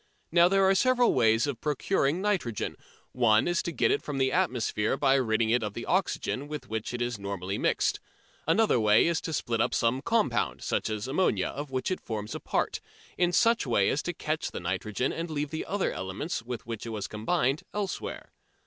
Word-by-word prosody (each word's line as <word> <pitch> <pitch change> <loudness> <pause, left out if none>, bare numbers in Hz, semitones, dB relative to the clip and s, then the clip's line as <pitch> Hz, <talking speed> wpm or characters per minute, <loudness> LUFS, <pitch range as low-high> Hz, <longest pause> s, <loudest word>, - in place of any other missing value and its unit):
Now 170 +1 +6
there 195 +1 +3
are 190 - +5
several 250 +4 +3
ways 115 -1 +3
of 140 -5 -4
procuring 150 +2 0
nitrogen. 180 - -1 0.4
One 110 -1 +3
is 175 -1 +1
to 170 - -3
get - - +2
it - - +1
from 145 -2 -5
the 130 0 +2
atmosphere 125 - 0
by 135 -1 +3
ridding 115 -4 +2
it 120 +1 +3
of 105 -2 -4
the 120 - -5
oxygen 175 -6 -1
with 150 0 -6
which 110 0 -3
it 120 0 -2
is 120 -3 -3
normally 100 -1 -4
mixed. - - +1 0.5
Another 210 - +3
way 105 -1 +5
is 170 -1 +1
to - - -4
split 120 -6 -1
up - - +1
some 120 +3 +1
compound, 150 - 0
such - - -1
as 110 +1 -3
ammonia, 135 - +1
of 145 0 -6
which 130 +6 -2
it 185 - -2
forms 105 -2 -5
a - - -4
part, - - -1 0.3
in 175 -1 +2
such 230 +3 +3
a - - -6
way 100 -4 +3
as - - 0
to - - -3
catch - - -2
the - - -6
nitrogen 105 +5 -2
and 165 +1 -4
leave 150 -2 -3
the 160 - -4
other 200 0 0
elements 95 - -4
with 120 0 -6
which 115 0 -6
it - - -4
was 110 -3 -4
combined 135 +6 0
elsewhere. 205 -2 -4
130 Hz, 210 wpm, -28 LUFS, 110-170 Hz, 0.5 s, Now